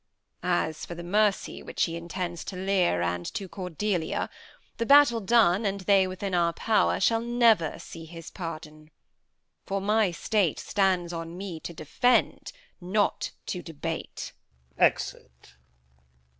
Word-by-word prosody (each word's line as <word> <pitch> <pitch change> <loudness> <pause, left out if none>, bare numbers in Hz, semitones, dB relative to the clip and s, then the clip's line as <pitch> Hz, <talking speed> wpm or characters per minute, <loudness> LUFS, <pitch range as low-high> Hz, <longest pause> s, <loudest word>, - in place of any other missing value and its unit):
As 175 -3 -1
for 170 - -6
the 170 - -7
mercy 205 +3 +1
Which - - -2
he 165 - -1
intends 175 0 -4
to 190 - -6
Lear 185 - +1
and 90 0 -1
to 195 - -3
Cordelia 180 -1 -2 0.5
The 230 - -1
battle 280 -5 +7
done, 205 -2 +4
and 200 -1 -1
they 190 0 +4
within 185 +1 -4
our 170 -1 +2
power, 220 +4 +2
Shall 225 -1 +3
never 230 -8 +3
see 165 -1 -10
his 165 0 -10
pardon; 155 -3 -8 0.8
for 195 0 -1
my 210 +1 +2
state 180 0 0
Stands 185 -3 0
on 165 +1 -6
me 185 -4 -6
to 170 - -7
defend, 245 - +1 0.3
not 200 +4 0 0.2
to 180 - -4
debate. 165 0 -6 0.4
Exit. 60 0 -1
180 Hz, 135 wpm, -27 LUFS, 165-205 Hz, 0.8 s, battle